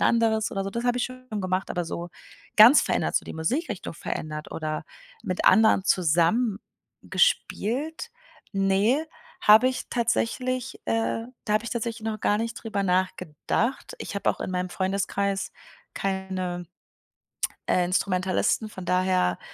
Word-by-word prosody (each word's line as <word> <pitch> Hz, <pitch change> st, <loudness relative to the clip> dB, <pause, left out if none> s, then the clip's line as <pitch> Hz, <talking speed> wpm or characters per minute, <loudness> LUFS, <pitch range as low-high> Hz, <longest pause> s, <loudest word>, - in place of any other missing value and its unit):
'n -, -, -1 dB
anderes 225 Hz, -2 st, +2 dB
oder 195 Hz, 0 st, -2 dB
so“, 195 Hz, -, -3 dB
das 235 Hz, +3 st, -4 dB
habe 245 Hz, 0 st, +2 dB
ich -, -, +1 dB
schon 255 Hz, 0 st, -9 dB
gemacht, 185 Hz, 0 st, -1 dB
aber 175 Hz, -, -1 dB
so 170 Hz, +1 st, -5 dB, 0.5 s
ganz 230 Hz, +7 st, +9 dB
verändert, -, -, 0 dB
so -, -, 0 dB
die -, -, -7 dB
Musikrichtung 210 Hz, -, -2 dB
verändert 155 Hz, -1 st, -5 dB
oder 155 Hz, -1 st, -3 dB, 0.4 s
mit 185 Hz, -, -3 dB
anderen 220 Hz, -1 st, +5 dB
zusammen 185 Hz, +6 st, +2 dB, 0.4 s
gespielt? 320 Hz, -, 0 dB, 0.4 s
Ne, 200 Hz, +10 st, +2 dB, 0.4 s
habe 220 Hz, +5 st, +7 dB
ich 260 Hz, -, -4 dB
tatsächlich, 245 Hz, +1 st, -1 dB
äh 225 Hz, 0 st, 0 dB, 0.2 s
da 210 Hz, -, -1 dB
habe 215 Hz, +2 st, +2 dB
ich -, -, -5 dB
tatsächlich 230 Hz, -1 st, -3 dB
noch 215 Hz, -1 st, -5 dB
gar 205 Hz, -, +2 dB
nicht 230 Hz, 0 st, -2 dB
drüber 215 Hz, -4 st, -3 dB
nachgedacht. 185 Hz, -, -1 dB
Ich -, -, -6 dB
habe 200 Hz, -, +1 dB
auch -, -, -7 dB
in -, -, -3 dB
meinem 180 Hz, 0 st, -2 dB
Freundeskreis 195 Hz, +1 st, -1 dB, 0.4 s
keine, 185 Hz, -2 st, -3 dB, 1.0 s
äh, 180 Hz, -, +3 dB
Instrumentalisten, 185 Hz, +3 st, 0 dB
von 190 Hz, -3 st, -9 dB
daher, 180 Hz, -, +1 dB
200 Hz, 145 wpm, -26 LUFS, 185-230 Hz, 1.0 s, ganz